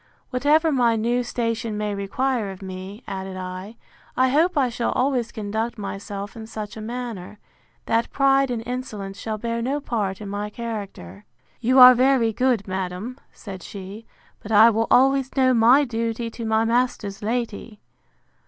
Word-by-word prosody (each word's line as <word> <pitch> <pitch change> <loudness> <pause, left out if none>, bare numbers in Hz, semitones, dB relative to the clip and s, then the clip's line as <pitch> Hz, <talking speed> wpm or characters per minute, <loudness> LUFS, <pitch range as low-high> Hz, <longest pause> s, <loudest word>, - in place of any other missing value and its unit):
—Whatever 300 +5 +3
my 240 -4 +3
new 235 +3 +1
station 230 -2 -2
may 210 -1 -2
require 215 +3 -1
of 190 0 -9
me, 190 +4 -8
added 190 -1 -5
I, 185 +4 -7 0.4
I 260 0 +4
hope 320 +6 +2
I 270 -3 +3
shall 235 0 -2
always 250 -3 0
conduct 220 +3 -3
myself 200 0 -6
in 220 -1 -8
such 215 -2 -7
a 220 - -7
manner, 225 -4 -6 0.5
that 230 +1 +1
pride 275 -1 +3
and 235 -2 -3
insolence 215 -6 -5
shall 220 -1 -3
bear 230 +1 -3
no 270 +5 -1
part 210 -8 -2
in 210 - -7
my 205 +1 -4
character. 200 - -7 0.4
You 250 +2 +2
are 255 0 +11
very 250 -2 +3
good, 245 -3 +1
madam, 190 +6 -4
said 195 -3 -9
she; 200 +4 -9 0.3
but 210 - -9
I 220 +2 +7
will 225 +1 0
always 270 +1 +3
know 260 -1 +4
my 245 +5 +6
duty 230 -2 -3
to 230 0 -6
my 220 0 +2
master's 230 -4 -1
lady. 220 -1 -3
225 Hz, 160 wpm, -23 LUFS, 205-250 Hz, 0.5 s, are